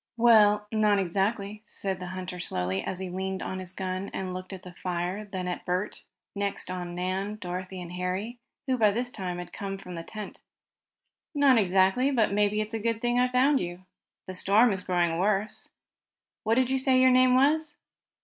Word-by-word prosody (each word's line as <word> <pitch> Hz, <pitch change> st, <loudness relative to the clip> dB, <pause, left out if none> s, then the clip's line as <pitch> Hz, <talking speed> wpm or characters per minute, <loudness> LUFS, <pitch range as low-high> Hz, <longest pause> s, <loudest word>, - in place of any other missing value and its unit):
"Well, 210 Hz, -3 st, +5 dB
not 215 Hz, -2 st, +3 dB
exactly," 200 Hz, +3 st, -1 dB
said 190 Hz, -3 st, -4 dB
the 180 Hz, -, -6 dB
hunter 185 Hz, 0 st, -6 dB
slowly, 95 Hz, -, -2 dB
as 190 Hz, -, -3 dB
he 185 Hz, -1 st, -4 dB
leaned 190 Hz, +1 st, -3 dB
on 190 Hz, -, -4 dB
his 185 Hz, -1 st, -7 dB
gun, 190 Hz, 0 st, -4 dB
and 185 Hz, -1 st, -3 dB
looked 185 Hz, +1 st, -6 dB
at 190 Hz, -1 st, -8 dB
the 180 Hz, -, -10 dB
fire, 180 Hz, +3 st, -3 dB
then 185 Hz, -3 st, -5 dB
at 180 Hz, -, -4 dB
Bert 180 Hz, +3 st, -2 dB, 0.3 s
and 200 Hz, -, -7 dB
next 200 Hz, -2 st, -2 dB
on 175 Hz, -1 st, -5 dB
Nan, 190 Hz, +3 st, -2 dB
Dorothy 185 Hz, -1 st, -6 dB
and 175 Hz, -1 st, -7 dB
Harry, 185 Hz, +6 st, -3 dB, 0.3 s
who 255 Hz, -2 st, 0 dB
by 215 Hz, -2 st, +6 dB
this 245 Hz, +4 st, -2 dB
time 180 Hz, -5 st, -4 dB
had 175 Hz, -1 st, -8 dB
come 195 Hz, -1 st, -4 dB
from 180 Hz, -2 st, -9 dB
the 165 Hz, -, -5 dB
tent. 210 Hz, +4 st, -8 dB, 0.9 s
"Not 275 Hz, -4 st, +5 dB
exactly, 195 Hz, +6 st, +3 dB
but 230 Hz, -7 st, +2 dB
maybe 210 Hz, +1 st, +2 dB
it's 215 Hz, +1 st, -5 dB
a 225 Hz, -, -1 dB
good 230 Hz, +1 st, 0 dB
thing 240 Hz, +1 st, +1 dB
I 250 Hz, -, +4 dB
found 260 Hz, +3 st, +3 dB
you. 175 Hz, +1 st, -6 dB, 0.4 s
The 185 Hz, -, -6 dB
storm 210 Hz, +6 st, +4 dB
is 190 Hz, -2 st, -1 dB
growing 175 Hz, -2 st, 0 dB
worse. 205 Hz, +2 st, 0 dB, 0.8 s
What 225 Hz, +1 st, +3 dB
did 260 Hz, +1 st, +2 dB
you 265 Hz, -, +2 dB
say 260 Hz, -1 st, +3 dB
your 260 Hz, 0 st, +6 dB
name 255 Hz, 0 st, +5 dB
was?" 295 Hz, +3 st, +2 dB
195 Hz, 195 wpm, -28 LUFS, 185-225 Hz, 0.9 s, by